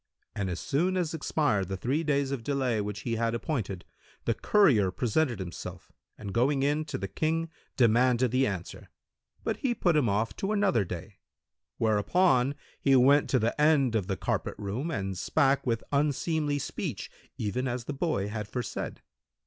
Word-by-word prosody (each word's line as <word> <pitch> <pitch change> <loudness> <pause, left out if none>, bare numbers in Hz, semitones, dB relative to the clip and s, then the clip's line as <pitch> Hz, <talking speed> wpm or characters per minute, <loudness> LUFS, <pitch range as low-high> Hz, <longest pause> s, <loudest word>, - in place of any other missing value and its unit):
And 95 -2 -2
as 90 - -3
soon 180 +7 0
as 170 -3 -1
expired 145 - 0
the 95 0 -3
three 135 - 0
days 140 -3 +1
of 135 -5 -3
delay 130 -5 0
which 105 0 -4
he 115 +1 -2
had 115 0 0
appointed, 110 - -3 0.4
the 115 - +2
courier 130 - +4
presented 120 +6 0
himself 90 -3 -7 0.3
and 100 -3 -7
going 135 +4 +2
in 150 +2 +1
to 150 -3 -4
the 100 - -4
King, 160 +8 -1 0.3
demanded 125 +1 +4
the 130 +1 +3
answer; 95 -4 -6 0.5
but - - -1
he 245 -3 0
put 175 -6 +2
him 140 -7 +3
off 105 +1 0
to 195 +2 -1
another 200 - +2
day; 95 +3 -7 0.6
whereupon 125 - +2 0.3
he 135 -1 +4
went 140 +3 +5
to 130 - +3
the 115 +5 0
end 145 -5 +4
of 105 -5 0
the 95 -2 -2
carpet - - -2
room[FN#174] 115 +11 -3
and 95 -1 -4
spake 140 -3 +2
with 115 -2 0
unseemly 145 +1 +1
speech, 140 - -4 0.3
even 125 +5 -2
as 120 -1 -3
the 145 - -4
boy 135 - -1
had 105 0 -4
foresaid. 120 +2 -5
125 Hz, 175 wpm, -29 LUFS, 105-150 Hz, 0.6 s, went